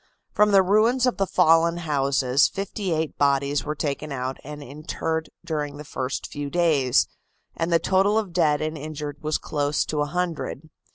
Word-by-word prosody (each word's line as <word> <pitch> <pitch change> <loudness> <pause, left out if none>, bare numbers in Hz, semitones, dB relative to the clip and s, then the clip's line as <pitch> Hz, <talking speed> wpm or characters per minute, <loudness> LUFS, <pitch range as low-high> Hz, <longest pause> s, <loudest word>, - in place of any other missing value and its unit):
From 210 0 +4
the 195 -1 +6
ruins 225 +6 +3
of 250 - +1
the 195 - +1
fallen 165 +1 +4
houses 140 -4 +2
fifty 195 -1 -4
eight 160 -1 -2
bodies 140 0 +2
were 150 +1 -3
taken 150 0 -3
out 130 0 -4
and 150 +1 -8
interred 155 +3 -4 0.2
during 150 -2 -3
the 150 - -8
first 130 -1 -4
few 145 -1 -5
days, 150 -7 +3 0.5
and 165 +1 -2
the 170 - +6
total 195 +5 +2
of 205 -6 -2
dead 155 -4 +2
and 155 +1 -3
injured 150 -1 -6
was 155 0 0
close 145 -1 -1
to 150 -1 -2
a - - +2
hundred. 160 -2 -3
155 Hz, 175 wpm, -24 LUFS, 145-175 Hz, 0.5 s, the